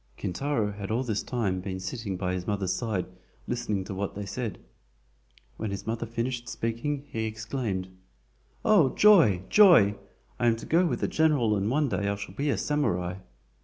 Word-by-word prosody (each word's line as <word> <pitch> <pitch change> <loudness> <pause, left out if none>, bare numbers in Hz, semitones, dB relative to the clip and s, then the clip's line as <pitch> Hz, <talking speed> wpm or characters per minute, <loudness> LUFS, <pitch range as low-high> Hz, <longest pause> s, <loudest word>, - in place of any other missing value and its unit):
Kintaro 110 +2 -1
had 100 -1 -7
all 115 +4 0
this 110 -5 -1
time 100 -7 -2
been 95 0 -5
sitting 95 0 -4
by 90 0 -2
his 90 -1 -4
mother's 100 -3 0
side 105 -3 -2 0.4
listening 105 -5 -2
to 95 - -6
what 100 +1 -3
they 100 0 -5
said. 110 0 -4 1.0
When 110 - -3
his 100 0 -5
mother 115 +1 -3
finished 120 +1 -3
speaking, 135 +6 -3
he 110 0 -3
exclaimed: 110 -3 -3 0.8
"Oh, 175 -12 +4
joy! 165 - +6
joy! 175 - +7 0.5
I 120 - +2
am 115 - +4
to 115 - -9
go 175 +3 +3
with - - -2
the - - +1
general 145 -9 +2
and 100 +1 0
one 145 +3 +2
day 100 -5 -1
I 100 - 0
shall 100 -2 -8
be 140 +8 -1
a - - +1
SAMURAI!" 90 -11 -1
110 Hz, 180 wpm, -27 LUFS, 100-130 Hz, 1.0 s, joy